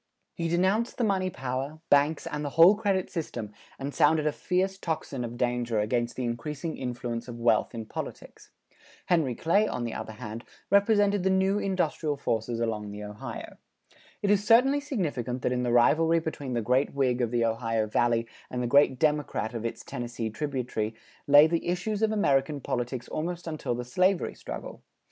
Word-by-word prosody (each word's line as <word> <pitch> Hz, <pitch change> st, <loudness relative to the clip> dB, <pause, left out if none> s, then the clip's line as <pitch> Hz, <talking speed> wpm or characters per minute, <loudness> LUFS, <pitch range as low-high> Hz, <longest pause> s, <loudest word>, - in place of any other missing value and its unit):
He 165 Hz, -, -2 dB
denounced 190 Hz, +7 st, +1 dB
the 245 Hz, -, 0 dB
money 190 Hz, -3 st, +1 dB
power, 135 Hz, +1 st, -4 dB
banks 145 Hz, +2 st, +3 dB
and 150 Hz, 0 st, -4 dB
the 145 Hz, -, -2 dB
whole 170 Hz, +4 st, +9 dB
credit 200 Hz, -3 st, -1 dB
system 120 Hz, -, -4 dB, 0.3 s
and 140 Hz, +1 st, -5 dB
sounded 155 Hz, 0 st, +3 dB
a 150 Hz, -, +3 dB
fierce 190 Hz, +4 st, -1 dB
tocsin 155 Hz, -7 st, -3 dB
of 120 Hz, 0 st, -6 dB
danger 120 Hz, -2 st, 0 dB
against 120 Hz, +2 st, 0 dB
the 130 Hz, -, -3 dB
increasing 145 Hz, +7 st, -3 dB
influence 120 Hz, -1 st, -4 dB
of 120 Hz, -1 st, -7 dB
wealth 120 Hz, +1 st, +2 dB
in 115 Hz, -1 st, -5 dB
politics. -, -, -8 dB, 0.6 s
Henry 160 Hz, -9 st, +1 dB
Clay, 200 Hz, -, +2 dB
on 120 Hz, -, -3 dB
the 115 Hz, -2 st, -3 dB
other 110 Hz, -, -6 dB
hand, 110 Hz, 0 st, -7 dB, 0.3 s
represented 205 Hz, 0 st, +4 dB
the 190 Hz, -, +1 dB
new 190 Hz, +2 st, +2 dB
industrial 165 Hz, -6 st, -1 dB
forces 115 Hz, -2 st, -2 dB
along 110 Hz, -3 st, -2 dB
the 105 Hz, +1 st, -7 dB
Ohio. 105 Hz, 0 st, -8 dB, 0.7 s
It 205 Hz, -, +3 dB
is 205 Hz, -1 st, +3 dB
certainly 250 Hz, +6 st, +5 dB
significant 145 Hz, -, -3 dB
that -, -, +1 dB
in 125 Hz, 0 st, 0 dB
the 120 Hz, -1 st, 0 dB
rivalry 160 Hz, +8 st, +4 dB
between 150 Hz, -5 st, -4 dB
the 120 Hz, -2 st, -1 dB
great 130 Hz, +5 st, +1 dB
Whig 130 Hz, -3 st, +1 dB
of 120 Hz, -, +1 dB
the 120 Hz, 0 st, +1 dB
Ohio 115 Hz, -1 st, 0 dB
Valley 115 Hz, +2 st, +1 dB, 0.2 s
and 125 Hz, 0 st, -3 dB
the -, -, 0 dB
great 135 Hz, +1 st, +4 dB
Democrat 150 Hz, -6 st, 0 dB
of 115 Hz, -1 st, -4 dB
its -, -, -7 dB
Tennessee 120 Hz, -4 st, -4 dB
tributary 120 Hz, -4 st, -3 dB, 0.3 s
lay 145 Hz, +1 st, +8 dB
the 165 Hz, +1 st, -1 dB
issues 190 Hz, +4 st, -1 dB
of 220 Hz, -1 st, +3 dB
American 145 Hz, -8 st, +1 dB
politics 125 Hz, -1 st, -3 dB
almost 175 Hz, +2 st, -4 dB
until 155 Hz, -7 st, -3 dB
the 125 Hz, +1 st, -5 dB
slavery 185 Hz, +8 st, +1 dB
struggle. -, -, -8 dB
140 Hz, 180 wpm, -28 LUFS, 120-175 Hz, 0.7 s, whole